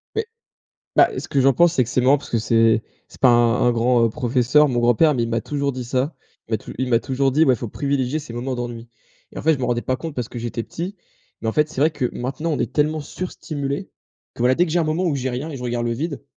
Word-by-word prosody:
Beh, 445 0 0 0.7
bah, - - +6
ce - - -5
que 140 - +1
j'en 135 +1 +5
pense 170 +5 +4
c'est 130 - +3
que 120 - -8
c'est 130 - +2
marrant 135 +3 +4
parce 140 - -12
que 115 - +1
c'est 115 0 +3 0.3
c'est - - -17
pas 130 - +6
un 120 0 +4
un - - +5
grand, 120 0 +3
heu, - - +3
professeur, 125 +5 +3
mon 125 -2 -1
grand-père, 120 +6 +4
mais 120 - 0
il - - -4
m'a 115 0 0
toujours 140 +1 -2
dit 130 -1 -5
ça, 130 +5 -1 0.3
il - - -9
m'a - - +2
tou - - -10
il 130 - -1
m'a 115 -2 +3
toujours 135 +1 0
dit, 155 +4 +4
ouais: 130 - +4
«Faut 120 - -5
privilégier 140 +3 -1
ses 145 -6 -9
moments 125 +2 -3
d'ennui» 120 -1 -6 0.4
et - - -7
en - - -5
fait, 160 +1 +4
je - - -6
m'en 130 - -1
rendais 120 -1 0
pas 130 - -1
compte 160 +2 -6
parce 125 -4 -3
que 120 - -7
j'étais 120 0 -3
petit, 180 - -6 0.4
mais 110 - -3
en - - 0
fait, 150 +3 +2
c'est 155 -4 -5
vrai 155 +3 +4
que 145 -5 -2
maintenant 135 +6 -3
on - - -1
est - - -2
tellement 155 +1 +1
sur-stimulés 145 -1 -5 0.4
que, - - -4
voilà, 125 +1 +4
dès 175 - +3
que - - -5
j'ai 175 - +2
un 170 - +2
moment 155 +4 0
où 165 -5 +1
j'ai 130 -1 -2
rien 130 +6 -4
et 145 - -6
je 125 - -8
regarde 120 -1 -2
le 120 - 0
vide, 145 +4 -4
130 Hz, 290 wpm, -21 LUFS, 120-150 Hz, 0.7 s, bah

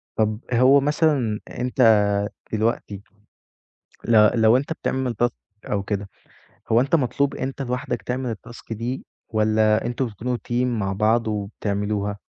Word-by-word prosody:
طَب 110 -1 0
هو 130 +4 +6
مثلًا 145 -7 +1
أنت 125 +1 -2 0.7
دلوقتي، 110 -2 -1 1.0
ل 115 0 +4
لو 110 +2 +6
أنت 140 +4 -2
بتعمل 130 -5 -2
task 120 - +5 0.4
أو 100 -1 0
كده، 100 0 -3 0.6
هو 115 +2 +5
أنت 140 +5 +2
مطلوب 140 0 0
أنت 135 +1 -4
لوحدك 125 -1 -3
تعمل 125 -2 -3
الtask 115 +2 -10
دي، 120 +4 -4 0.2
والّا 110 0 +2
أنتم 120 +2 -1
بتكونوا 120 +3 -3
team 120 +1 +1
مع 105 -6 -1
بعض 110 +3 +2
وبتعملوها؟ 105 0 -2
115 Hz, 130 wpm, -23 LUFS, 105-125 Hz, 1.0 s, هو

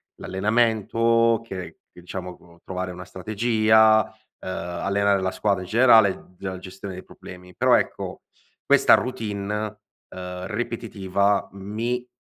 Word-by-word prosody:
l'allenamento, 115 +2 +2
che 95 -5 -8
che 90 - -16
ciamo 90 0 -6
co 85 -1 -21
trovare 95 0 -4
una 90 0 -8
strategia, 110 +2 +3 0.3
ehm, - - -10
allenare 100 +3 0
la 95 0 -1
squadra 95 0 0
in - - -10
generale, 110 -6 +4
la 95 -1 -5
gestione 95 +1 -8
dei 90 - -8
problemi. 90 0 -13
Però - - +3
ecco, - - -2 0.4
questa - - +5
routine, 105 -5 -1 0.6
uhm, 90 0 -7
ripetitiva, 100 -3 -1
mi 115 +6 -3
100 Hz, 125 wpm, -24 LUFS, 95-110 Hz, 0.6 s, questa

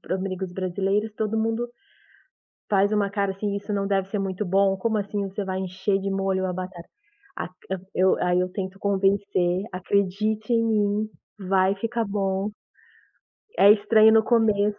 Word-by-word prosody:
pra - - -3
amigos 190 -1 -4
brasileiros, 195 +3 -1
todo 220 0 -1
mundo 225 +2 -1 1.0
faz 200 0 +3
uma 205 -2 +1
cara 200 -1 -1
assim: 200 +1 -3
"Isso 205 +1 -5
não 200 -1 -1
deve 195 -1 0
ser 205 - -2
muito 195 +1 -2
bom, 195 +1 +3
como 220 +2 0
assim 200 -1 -3
você 200 +1 -4
vai 190 0 -3
encher 190 +2 -1
de 195 0 -3
molho 195 -1 0
a 180 - -2
batata?". 180 -1 -7 0.5
Aq 180 - -5 0.2
a 190 - 0 0.2
eu 185 +1 +4
aí 180 0 +2
eu 180 0 0
tento 190 -1 -5
convencer: 195 -2 +1
"Acredite 200 +4 0
em 230 - +3
mim, 215 -1 +1 0.4
vai 190 0 +3
ficar 230 +3 -2
bom, 195 0 -1 1.1
é 200 - +8
estranho 215 +1 +5
no 220 - +6
começo, 210 -3 +2
200 Hz, 165 wpm, -24 LUFS, 190-210 Hz, 1.1 s, é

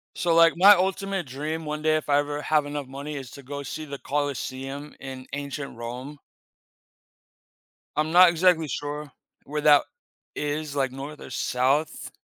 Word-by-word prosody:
So, 170 -1 +1
like 165 0 +6
my 195 +4 +9
ultimate 195 -1 -1
dream 150 +5 -4
one 150 0 -4
day, 155 0 +3
if 155 - -4
I 145 0 +4
ever 145 0 -2
have 150 -2 +2
enough 145 -1 -4
money 140 +3 -7
is 135 -3 -7
to 140 - -11
go 140 +2 -6
see 155 +3 -6
the 140 -2 -7
Colosseum 140 0 -4
in 130 -1 -8
ancient 140 -2 -5
Rome. 125 +5 -7 1.8
I'm 155 +1 0
not 180 0 +8
exactly 170 -2 +3
sure 145 0 -4 0.3
where 150 +1 -3
that 145 -1 +7 0.5
is, 150 0 -3
like 135 -2 0
north 140 +3 -8
or - - -10
south. 135 +5 0
145 Hz, 160 wpm, -25 LUFS, 140-155 Hz, 1.8 s, my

